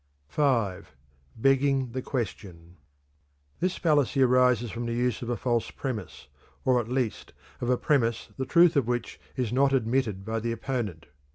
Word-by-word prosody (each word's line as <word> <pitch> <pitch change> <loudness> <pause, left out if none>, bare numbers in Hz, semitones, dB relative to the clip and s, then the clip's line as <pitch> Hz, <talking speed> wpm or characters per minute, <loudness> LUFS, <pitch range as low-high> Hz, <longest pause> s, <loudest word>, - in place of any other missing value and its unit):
V. 120 -11 +2 0.6
Begging 135 +1 +2
the 130 +2 -3
Question. 95 -9 -5 0.8
This 185 +1 0
fallacy 145 -4 +2
arises 125 -3 +3
from 120 +1 -4
the 115 - -2
use 125 -2 0
of 120 - -5
a 120 - -1
false 120 0 0
premise, 110 - -6 0.4
or 130 -1 +4
at 115 - -3
least 125 -3 -2 0.3
of 120 - -1
a 125 - +3
premise 120 -6 +1
the 130 - -3
truth 170 -1 +5
of 135 -5 +2
which 120 -1 -3 0.2
is 125 -4 -2
not 135 +1 +3
admitted 115 -5 0
by 110 +1 -2
the 115 +1 -2
opponent. 115 -8 -3
125 Hz, 160 wpm, -27 LUFS, 115-135 Hz, 0.8 s, truth